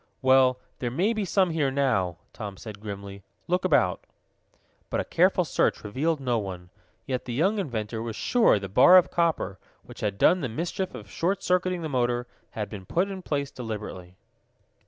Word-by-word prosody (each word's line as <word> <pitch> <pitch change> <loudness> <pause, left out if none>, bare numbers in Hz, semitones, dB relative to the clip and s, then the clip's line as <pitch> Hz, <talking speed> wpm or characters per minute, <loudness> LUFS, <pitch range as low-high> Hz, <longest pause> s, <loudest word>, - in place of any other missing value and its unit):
"Well, 130 -1 +5 0.2
there 120 - -1
may 185 - +1
be 215 -3 -2
some 185 -1 +2
here 155 -4 +1
now," 115 - 0 0.2
Tom 100 -3 -7
said 105 -1 -9
grimly. 100 -1 -7 0.3
"Look 180 +2 +1
about." 140 - +2 0.9
But - - -1
a - - 0
careful - - +3
search - - 0
revealed 150 +9 -1
no 125 -4 0
one. 90 -3 -7 0.3
Yet 130 -2 -3
the 120 - -4
young 195 - +2
inventor 115 - -3
was 115 -1 -5
sure 235 - +3
the 100 -1 -5
bar 130 - +7
of 180 - +4
copper, 160 - 0 0.2
which - - -13
had 100 -2 -2
done 180 - +4
the 130 - -2
mischief 170 +9 -3
of - - -9
short 190 +3 -1
circuiting 180 -1 +1
the - - -2
motor, 120 -3 0 0.2
had 105 -2 -4
been 95 -4 -9
put 185 - 0
in 190 -1 -6
place 140 -5 -2
deliberately. 105 -6 -7
130 Hz, 180 wpm, -26 LUFS, 105-170 Hz, 0.9 s, bar